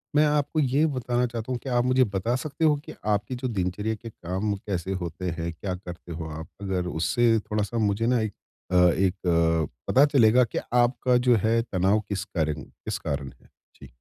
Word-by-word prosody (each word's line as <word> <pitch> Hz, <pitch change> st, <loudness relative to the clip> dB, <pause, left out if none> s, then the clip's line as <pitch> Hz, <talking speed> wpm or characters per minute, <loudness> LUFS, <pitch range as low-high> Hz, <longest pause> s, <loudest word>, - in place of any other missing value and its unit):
मैं 150 Hz, +1 st, +6 dB
आपको 150 Hz, +1 st, +1 dB
ये 140 Hz, +2 st, +3 dB
बताना 125 Hz, -4 st, 0 dB
चाहता 115 Hz, +1 st, -5 dB
हूँ 125 Hz, -, -1 dB
कि 135 Hz, -, -5 dB
आप 120 Hz, 0 st, +2 dB
मुझे 130 Hz, 0 st, +4 dB
बता 100 Hz, +3 st, -1 dB
सकते 145 Hz, +4 st, -2 dB
हो 150 Hz, -1 st, +5 dB
कि -, -, -8 dB, 0.2 s
आपकी 105 Hz, +5 st, -2 dB
जो 125 Hz, +1 st, -3 dB
दिनचर्या 105 Hz, +1 st, -2 dB
के 115 Hz, +2 st, -9 dB
काम 95 Hz, +1 st, -3 dB
कैसे 95 Hz, -2 st, -4 dB
होते 90 Hz, +2 st, -4 dB
हैं, 85 Hz, 0 st, -3 dB
क्या 95 Hz, +3 st, -4 dB
करते 90 Hz, -2 st, -10 dB
हो 80 Hz, -1 st, -5 dB
आप? 80 Hz, +1 st, -7 dB
अगर 95 Hz, -2 st, -2 dB
उससे 110 Hz, +8 st, +2 dB
थोड़ा-सा 105 Hz, +2 st, -2 dB
मुझे 105 Hz, +1 st, +1 dB
ना 125 Hz, -1 st, +3 dB
एक 110 Hz, -2 st, -2 dB, 0.4 s
अ 90 Hz, -, +1 dB, 0.2 s
एक 95 Hz, -1 st, +2 dB
अ, 85 Hz, -1 st, +3 dB, 0.2 s
पता 140 Hz, +3 st, +6 dB
चलेगा 125 Hz, -4 st, +5 dB
कि 115 Hz, -, -4 dB, 0.2 s
आपका 125 Hz, +1 st, +3 dB
जो 120 Hz, -, +7 dB
है 115 Hz, +1 st, +3 dB
तनाव 100 Hz, -1 st, +1 dB
किस 100 Hz, -3 st, -2 dB
कारण 75 Hz, -6 st, -2 dB
किस -, -, -6 dB
कारण 70 Hz, -1 st, -3 dB
है? -, -, -24 dB, 0.3 s
जी। 70 Hz, -, -13 dB
105 Hz, 200 wpm, -26 LUFS, 90-125 Hz, 0.4 s, जो